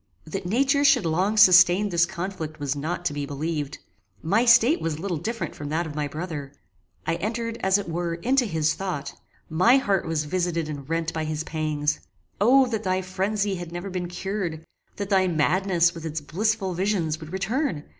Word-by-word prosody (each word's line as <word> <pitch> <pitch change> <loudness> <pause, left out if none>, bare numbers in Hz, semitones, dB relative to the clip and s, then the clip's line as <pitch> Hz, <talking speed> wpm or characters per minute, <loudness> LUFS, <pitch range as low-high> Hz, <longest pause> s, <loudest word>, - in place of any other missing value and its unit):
That 175 +3 -5
nature 275 +7 +2
should 275 -8 +5
long 185 +7 +1
sustain 185 0 +7
this 170 -2 +3
conflict 175 -4 -5
was 145 -1 -1
not 170 +5 -4
to 170 - 0
be 145 -1 -4
believed. 145 0 -3 0.5
My 210 +9 +2
state 240 +6 +5
was 160 -2 -2
little 175 0 -3
different 180 0 -4
from 145 0 -7
that 165 +3 -1
of 155 - -6
my 150 -1 -2
brother. 150 -2 -6 0.5
I 165 - 0
entered, 230 +2 -3
as 190 +1 +3
it 205 - -5
were, 170 0 -2
into 250 +9 +1
his 160 -6 +1
thought. 175 -8 -4 0.3
My 185 +11 +4
heart 200 -8 0
was 160 -2 0
visited 170 0 -1
and 145 -2 -7
rent 165 0 -1
by 160 -1 -2
his 155 0 -3
pangs 155 -2 -1 0.4
Oh 260 +6 +6
that 220 -3 -2
thy 185 -2 -1
phrenzy 195 +2 -1
had 175 -1 -7
never 175 +3 -5
been 180 -1 -3
cured! 180 -3 -4 0.3
that 200 0 -5
thy 190 -1 +4
madness, 170 +1 +2
with 165 - -9
its 160 -1 -3
blissful 190 +6 -1
visions, 175 -4 -1
would 155 -1 -10
return! 215 - -1
175 Hz, 185 wpm, -25 LUFS, 160-200 Hz, 0.5 s, sustain